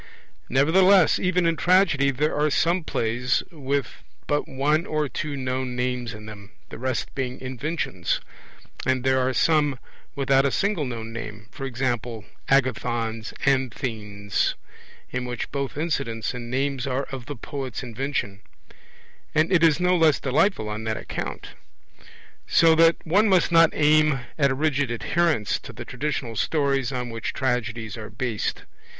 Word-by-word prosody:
Nevertheless 180 +6 +5
even 180 -1 +1
in 165 0 +2
Tragedy 175 -6 +3
there 145 +3 0
are 150 +1 +2
some 170 +4 +2
plays 120 -1 0
with 140 -5 -3 0.2
but 145 0 0
one 150 +5 +1
or 155 -1 0
two 145 +1 -4
known 130 -1 -2
names 125 -1 -2
in 105 0 -11
them, 100 -2 -10 0.2
the - - -9
rest 130 0 -2
being 130 -1 -3
inventions; 130 - -2 0.6
and 130 -1 +1
there 130 0 +3
are 130 0 +1
some 145 0 +2 0.4
without 135 -1 +3
a 140 - +3
single 195 +1 0
known 115 -2 -6
name, 110 -2 -7 0.2
e.g. 130 0 -3 0.6
Agathon's 120 -4 0
Anthens, 110 -7 -1 0.6
in 125 0 -3
which 120 -2 -4
both 140 0 -3
incidents 135 -9 -2
and 120 -1 -6
names 135 +1 -1
are 135 +1 -1
of 130 -3 -7
the 145 - -5
poet's 135 0 -5
invention; 120 -4 -3 0.9
and 155 +3 +3
it 175 - +5
is 160 -1 +5
no 180 0 +3
less 160 -4 +4
delightful 135 - +1
on 105 +1 -4
that 110 0 -1
account. - - -5 1.0
So 165 0 +5
that 165 +1 +6
one 200 +6 +3
must 185 -3 +3
not 165 -1 +7
aim 150 -2 +4 0.2
at 140 -1 +4
a 135 - 0
rigid 145 -2 +1
adherence 135 0 0
to - - -10
the - - -9
traditional 125 -3 -3
stories 140 0 +1
on 125 -2 -3
which 115 -1 -4
tragedies 115 -4 -2
are 110 -1 -7
based. 110 0 -3
135 Hz, 150 wpm, -24 LUFS, 120-155 Hz, 1.0 s, not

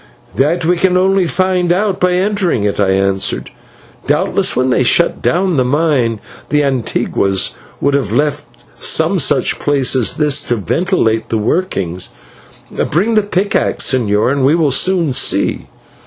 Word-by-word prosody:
"That 160 +5 0
we 175 +2 +2
can 180 +1 +2
only 190 0 +2
find 185 -1 0
out 195 +1 0
by 180 -1 +1
entering 185 - 0
it," 105 0 -2
I 100 -2 +2
answered. 95 0 0 0.6
"Doubtless - - +1
when 130 0 +1
they 125 - +2
shut 170 +7 +2
down 180 -2 0
the 130 - +3
mine, 130 -5 0 0.3
the 150 0 +2
/antiguos/ 115 -7 -1 0.3
would 140 - 0
have 135 -8 -1
left 145 +4 -1 0.3
some - - +1
such - - +1
place 140 -3 +1
as 125 -4 +1
this 150 -3 +1
to 120 - 0
ventilate 115 - -1
the 115 - 0
workings. 100 - -2 0.8
Bring 195 +10 0
the 215 - +4
pickaxe, 200 -6 0
señor, 110 -2 +1
and 140 -1 -1
we 140 +4 +3
will 155 -4 +1
soon 170 0 +1
see." - - 0
145 Hz, 155 wpm, -14 LUFS, 120-180 Hz, 0.8 s, the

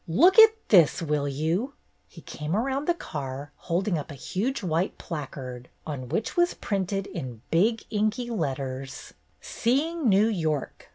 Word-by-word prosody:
" - - -40 0.2
Look 375 +5 +8
at 445 0 +9
this, 175 -8 +6
will 150 -3 -1
you? 165 - -1 0.2
" - - -44
He - - -14
came 150 +3 -4
around 270 +6 -1
the 345 - +3
car, 140 - -6
holding 175 0 -1
up 150 - -7
a 145 - -7
huge 225 - -2
white 170 +1 0
placard, 130 -6 -7 0.2
on 135 -5 -5
which 220 - -2
was 350 0 +2
printed 195 0 -2
in 125 - -7
big 220 +8 +2
inky 215 +3 0
letters: 135 - -4 0.3
SEEING 285 +4 0
NEW 200 +2 +5
YORK! 160 -10 -2
175 Hz, 160 wpm, -26 LUFS, 145-230 Hz, 0.3 s, at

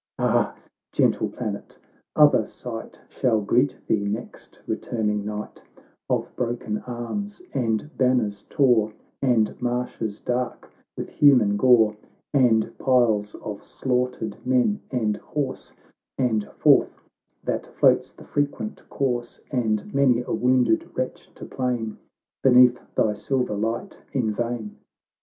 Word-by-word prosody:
Ah, - - +1 0.4
gentle - - +2
planet! 105 -5 -6 0.4
other 145 -6 +6
sight 115 -2 -8
Shall 120 -5 +1
greet 125 +7 +2
thee, 105 -2 +1
next 105 +4 -6
returning 105 -3 -1
night, 105 0 -6 0.5
Of - - -1
broken 120 -3 -2
arms 125 - -4
and 115 +5 -1
banners 120 -6 +2
tore, 120 -7 +3 0.3
And 120 -5 +2
marshes 120 -3 -2
dark 125 0 -3 0.3
with - - -4
human 125 -8 +5
gore, 110 -2 +5 0.4
And 120 -6 +3
piles 110 -5 +2
of 105 -1 -7
slaughtered 125 -4 -2
men 130 +11 +2
and 110 -5 0
horse, 145 -3 -4 0.5
And 110 -5 +1
Forth - - +4 0.4
that - - -2
floats - - +3
the - - -15
frequent 145 +9 -2
corse, 120 -3 -2
And 110 -5 -1
many 130 -3 +3
a - - -5
wounded 125 -2 +2
wretch - - -4
to - - -9
plain 120 -4 -3 0.4
Beneath 125 -1 +6
thy 105 - +2
silver 125 +3 -1
light 115 - -3
in 120 -5 +1
vain 115 -1 -3
120 Hz, 120 wpm, -24 LUFS, 110-130 Hz, 0.5 s, other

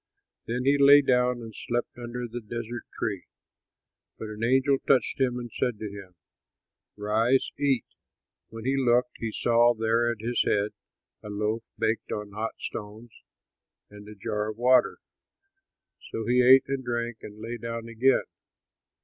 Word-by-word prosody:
Then 125 +2 -2
he 140 +1 +4
lay 140 +1 +8
down 125 -2 +2
and 110 -1 -9
slept 120 0 -3
under 120 0 -5
the 120 +1 -6
desert 115 +2 -6
tree, 100 -4 -3 0.9
but 110 - -6
an 105 +1 -6
angel 130 +3 +3
touched 135 0 +2
him 125 -2 +1
and 120 -1 -6
said 125 0 -1
to 105 -1 -6
him, 95 -3 -11 0.8
"Rise, 110 +5 +1
eat!" 135 -5 +1 0.6
When 115 0 -9
he 135 +1 +1
looked, 125 -1 +2
he 115 -1 -3
saw 120 +1 +3
there 115 +1 +1
at 120 -2 -3
his 120 +2 0
head 105 +1 +1 0.5
a 105 - -9
loaf, 105 +2 -1 0.2
baked 110 +1 -1
on 105 -1 -4
hot 110 +2 -4
stones, 110 +2 -7 0.8
and 105 0 -12
a 105 - -10
jar 105 +1 -3
of 110 - -7
water. 125 +2 +4 1.1
So 115 - -4
he 125 +2 +3
ate 130 +1 +7
and 135 -1 -2
drank 120 -1 -3
and 105 0 -10
lay 115 +2 -5
down 115 0 -5
again. 120 +3 +2
115 Hz, 160 wpm, -27 LUFS, 110-125 Hz, 1.1 s, lay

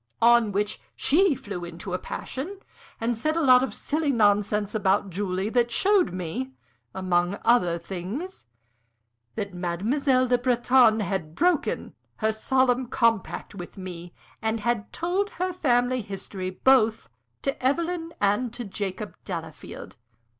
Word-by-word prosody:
On 235 -2 +6
which 205 +2 -1
she 335 +1 +3
flew 200 -7 -6
into 175 +2 -7
a 180 - -1
passion, 320 - -6 0.4
and 235 +1 0
said 310 +8 -1
a 330 - +1
lot 255 -2 +7
of 265 - -2
silly 305 -1 -1
nonsense 210 -2 +2
about 200 -2 +1
Julie, 190 +1 -2
that 240 0 +2
showed 385 - +3
me, 185 +10 -4 0.4
among 180 0 +1
other 180 -8 +4
things, 195 - -6 0.9
that 200 -2 -4
Mademoiselle 235 - +1
Le 245 0 +3
Breton 245 -2 +4
had 185 -5 -3
broken 350 -3 +1 0.2
her 220 0 +1
solemn 255 +2 +1
compact 230 -4 0
with 180 -1 -9
me, 175 -2 -7 0.3
and 220 0 -1
had 230 -1 -1
told 370 +4 -1
her 365 +1 -2
family 250 -6 +2
history 195 -2 -6
both 225 +2 +3 0.3
to 275 -2 -2
Evelyn 330 +4 0
and 210 +4 +1
to 245 -1 -5
Jacob 200 +1 -4
Delafield. 165 -4 -7
225 Hz, 135 wpm, -26 LUFS, 190-260 Hz, 0.9 s, lot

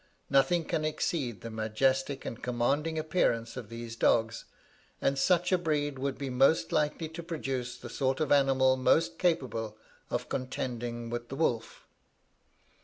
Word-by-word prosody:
Nothing 140 +5 +3
can 155 - -1
exceed 150 - -1
the 115 - -6
majestic 130 +6 0
and 115 - -6
commanding 140 +7 0
appearance 135 -8 0
of 120 -5 -7
these 115 0 -7
dogs, 115 0 +2 0.5
and 135 - +1
such 175 +6 +2
a 185 - +4
breed 145 -4 -1
would 135 0 -2
be 135 -2 -4
most 135 +6 +3
likely 150 +2 0
to 160 +2 -7
produce 135 -7 -4
the 120 - -9
sort 130 +2 -1
of 155 -3 0
animal 135 -2 +4
most 165 +6 +2
capable 125 - 0 0.3
of - - -2
contending 120 -2 -4
with 120 0 -4
the 135 - -5
wolf. 120 -7 -1
135 Hz, 150 wpm, -30 LUFS, 120-155 Hz, 0.5 s, a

